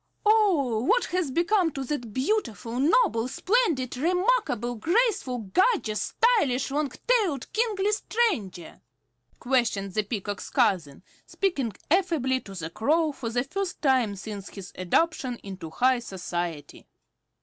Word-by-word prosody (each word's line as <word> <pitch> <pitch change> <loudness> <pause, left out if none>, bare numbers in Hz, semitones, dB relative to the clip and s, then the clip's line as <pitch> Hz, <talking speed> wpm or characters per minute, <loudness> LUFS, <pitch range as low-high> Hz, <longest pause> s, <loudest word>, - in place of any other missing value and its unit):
"Oh, 370 - +3
what 475 - +3
has 365 -5 0
become 345 +4 +2
of 265 -2 -4
the 295 - 0
beautiful, 240 - -2
noble, 285 - +3
splendid, 335 - 0
remarkable, 360 - +1
graceful, 345 - +1 0.2
gorgeous, 370 - +2 0.3
stylish, 275 - +2
long 290 -1 -1
tailed, 405 - +1
kingly 420 -3 +1
stranger?" 380 - -1 0.6
questioned 230 -7 0
the 215 - +2
Peacock's 205 -1 -5
cousin, 170 -7 +1 0.2
speaking 285 - -1 0.2
affably 320 -8 +2
to 195 -5 -11
the 165 -2 -5
Crow, 305 - +1
for 250 -5 -5
the 245 +1 0
first 390 +6 -4
time 255 -7 +2
since 200 0 -7
his 195 -1 -10
adoption 255 - 0
into 190 -4 -7
high 255 +8 +2
society. 175 -7 -5
260 Hz, 125 wpm, -26 LUFS, -, 0.6 s, Oh